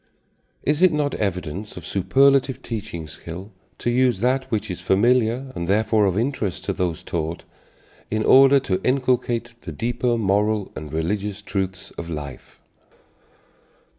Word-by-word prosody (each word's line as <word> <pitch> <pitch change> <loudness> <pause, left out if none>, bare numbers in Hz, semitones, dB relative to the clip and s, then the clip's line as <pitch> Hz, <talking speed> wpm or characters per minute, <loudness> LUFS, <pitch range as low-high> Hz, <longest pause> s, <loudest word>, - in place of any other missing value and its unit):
Is 150 +3 +1
it 185 -2 +6
not 150 -2 0
evidence 95 0 -3
of - - -8
superlative 135 +6 +3
teaching 90 -8 -5
skill 85 +6 -9 0.3
to 120 - -1
use 125 -4 +2
that 130 +3 +1
which 110 -3 -2
is 90 - -6
familiar 120 +6 +2
and, 85 - -3
therefore, 110 +2 +3
of 95 0 0
interest 115 -5 -2
to - - -1
those 85 -3 -2
taught, 80 0 -3 0.7
in 110 0 0
order 135 +3 +7
to 95 -8 -1
inculcate 125 -3 0
the - - -7
deeper 120 0 -1
moral 105 0 +1
and 75 -1 -7
religious 100 +5 -2
truths 95 -1 -3
of 85 0 -6
life? 75 -4 -7
105 Hz, 140 wpm, -23 LUFS, 95-125 Hz, 0.7 s, order